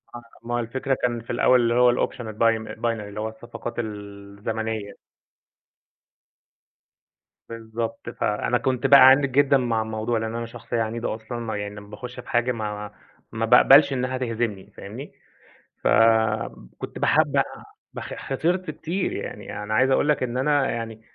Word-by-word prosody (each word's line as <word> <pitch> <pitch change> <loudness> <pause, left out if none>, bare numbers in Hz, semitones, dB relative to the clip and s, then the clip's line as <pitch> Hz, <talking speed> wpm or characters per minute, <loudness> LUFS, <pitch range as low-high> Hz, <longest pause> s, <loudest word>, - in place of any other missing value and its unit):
آه، 120 - -7 0.2
ما 120 - -5
هو - - 0
الفكرة 130 +3 -2
كان 120 -1 0
في 115 - -20
الأول 125 +1 +4
اللي 115 0 +2
هو 125 0 +5
الoption - - -16
الbim 110 0 0
الbinary، - - -6 0.2
اللي 105 +1 -8
هو 110 - -2
الصفقات 120 +1 -8
الزمنية. 105 0 -5 2.5
بالضبط، 115 0 -5
فأنا 120 +1 0
كنت 130 +2 0
بأَعَنِد 135 0 +7
جدًا 140 +1 +4
مع 120 -3 0
الموضوع، 110 +1 -2
لأن 110 +1 -3
أنا 115 0 -3
شخصية 115 0 -4
عنيدة 115 0 -2
أصلًا 115 +2 -7
ما 115 -2 -4
يعني 105 0 -5
لمّا 105 0 -11
باخش 125 +4 -8
بحاجة 120 +1 0
ما 105 -3 -5 0.4
ما 115 0 -1
باقبلش 135 +4 +7
إنها 130 0 -1
تهزمني، 115 -5 -3
فاهمني. 115 +9 -9 0.7
فكنت 110 - +1
باحب - - +2
أ - - +5 0.5
باخ - - -7
خسرت 175 +7 -2
كتير، 180 +4 -3
يعني - - -6
أنا 105 +1 -4
عايز 130 +4 +3
أقول 145 - +2
لك 145 -3 +2
إن 125 0 -2
أنا 145 0 +2
يعني 115 -1 -5
115 Hz, 150 wpm, -24 LUFS, 110-125 Hz, 2.5 s, بأَعَنِد